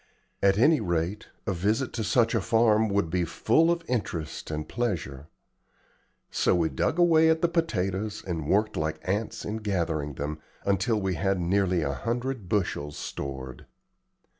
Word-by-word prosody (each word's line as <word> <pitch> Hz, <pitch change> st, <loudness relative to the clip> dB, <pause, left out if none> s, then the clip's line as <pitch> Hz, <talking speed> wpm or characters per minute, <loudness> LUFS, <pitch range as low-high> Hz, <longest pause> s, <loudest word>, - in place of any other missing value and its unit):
At 100 Hz, 0 st, +4 dB
any 150 Hz, +7 st, +5 dB
rate, 85 Hz, +2 st, -2 dB, 0.2 s
a 100 Hz, -, 0 dB
visit 105 Hz, +8 st, 0 dB
to 115 Hz, -, -2 dB
such 115 Hz, +2 st, +2 dB
a 115 Hz, -, +2 dB
farm 110 Hz, 0 st, +3 dB
would 100 Hz, -5 st, 0 dB
be 90 Hz, 0 st, +1 dB
full 160 Hz, -, +2 dB
of 170 Hz, -1 st, 0 dB
interest 85 Hz, -10 st, -3 dB
and 75 Hz, 0 st, -4 dB
pleasure. 80 Hz, -, -3 dB, 1.0 s
So -, -, +2 dB
we 85 Hz, -2 st, +2 dB
dug -, -, 0 dB
away 165 Hz, -2 st, +5 dB
at 160 Hz, +1 st, +2 dB
the -, -, +6 dB
potatoes, 105 Hz, -, -1 dB
and 80 Hz, -5 st, -3 dB
worked 105 Hz, +2 st, +2 dB
like 80 Hz, 0 st, -1 dB
ants 105 Hz, +4 st, -2 dB
in 105 Hz, +1 st, -3 dB
gathering 85 Hz, -9 st, -2 dB
them, 75 Hz, +3 st, -4 dB, 0.3 s
until 100 Hz, +3 st, +1 dB
we 95 Hz, -2 st, -1 dB
had 95 Hz, +3 st, 0 dB
nearly 90 Hz, -1 st, +1 dB
a 70 Hz, -1 st, -1 dB
hundred 120 Hz, -, -3 dB
bushels 85 Hz, -7 st, -1 dB
stored. 65 Hz, -2 st, -6 dB
100 Hz, 160 wpm, -27 LUFS, 85-115 Hz, 1.0 s, the